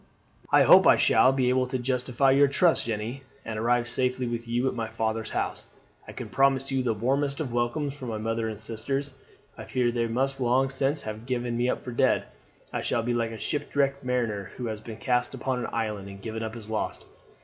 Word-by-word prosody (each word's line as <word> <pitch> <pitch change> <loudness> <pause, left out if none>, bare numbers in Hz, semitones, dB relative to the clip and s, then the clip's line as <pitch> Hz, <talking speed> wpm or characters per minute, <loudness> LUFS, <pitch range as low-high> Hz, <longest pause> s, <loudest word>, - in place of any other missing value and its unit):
"I - - +7
hope - - +8
I - - +7
shall 130 - +5
be 130 -2 +1
able 130 0 +2
to 130 - -2
justify 125 +1 +1
your 140 +1 +5
trust, 160 0 +2
Jeanne, 115 +4 -3 0.2
and 110 -1 -4
arrive 120 +1 +2
safely 125 +1 0
with 120 0 -4
you 120 +3 0
at - - 0
my 115 -2 -3
father's 110 0 -2
house. - - -3 0.4
I - - -7
can - - -7
promise 135 0 +2
you 135 -1 +1
the 120 -3 0
warmest 140 +5 0
of 135 -7 -3
welcomes 120 +4 -1
from 130 -4 -7
my 110 - -3
mother 115 +1 -1
and 110 -2 -6
sisters. 130 +6 -3 0.5
I - - -7
fear 125 -2 +1
they 120 -1 0
must 135 +3 -1
long 130 +2 +2
since 135 +2 -1
have 110 +2 -7
given 120 -2 -1
me 120 +1 +1
up - - -2
for 125 - -6
dead. 120 - +2 0.5
I - - -1
shall 115 - 0
be 120 +1 0
like 115 -1 0
a 115 - -7
shipwrecked 140 +1 -1
mariner 115 -6 -1
who 125 - -4
has 110 -1 -5
been 110 -1 -8
cast 125 0 0
upon 130 -1 -2
an - - -3
island 105 -4 -3
and 100 0 -10
given 110 +2 -5
up 110 0 -4
as 110 -3 -9
lost. 110 -1 -3
120 Hz, 220 wpm, -27 LUFS, 115-135 Hz, 0.5 s, hope